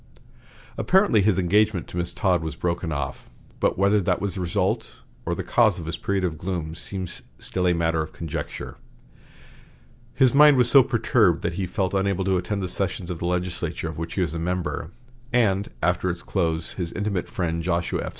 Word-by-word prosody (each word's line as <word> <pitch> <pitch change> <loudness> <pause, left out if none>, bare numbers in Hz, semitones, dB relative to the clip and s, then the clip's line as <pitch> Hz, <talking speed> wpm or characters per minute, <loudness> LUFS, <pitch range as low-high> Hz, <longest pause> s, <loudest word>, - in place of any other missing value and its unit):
Apparently 185 - +4
his 100 -1 +3
engagement 100 +1 +2
to - - -10
Miss 85 0 -2
Todd 90 -1 +1
was 80 -1 -4
broken 85 0 -2
off, 70 -2 -4 0.3
but - - +1
whether 100 +2 +3
that 90 - +1
was 100 -3 -2
the 95 - -4
result 85 -2 -1 0.3
or - - 0
the - - -4
cause 110 -6 +3
of 85 - -6
his 85 - -3
period 100 -1 -1
of 80 -4 -2
gloom 85 -4 -3
seems 90 +2 -6 0.2
still 90 -1 -1
a 90 - +4
matter 80 -1 +1
of 80 0 -5
conjecture. 80 -2 -6 1.4
His 130 -2 +4
mind 145 0 +7
was 125 -1 +4
so 140 - +9
perturbed 120 - +2
that 85 - -1
he 95 +2 -2
felt 95 0 -1
unable 95 -1 0
to 95 -1 +2
attend 100 +2 -2
the - - -1
sessions 90 -1 -2
of 85 - -5
the - - -3
legislature 90 0 -2
of - - -7
which 80 0 -5
he 95 - 0
was 85 -3 -1
a 85 - -3
member; 90 -1 -2 0.4
and 105 -5 +2
after 90 +1 +1
its 85 0 -4
close 80 -4 -1
his 85 -3 -4
intimate 100 -4 -2
friend 85 -2 -2
Joshua 85 0 -1
F. - - -4
90 Hz, 200 wpm, -24 LUFS, 85-100 Hz, 1.4 s, so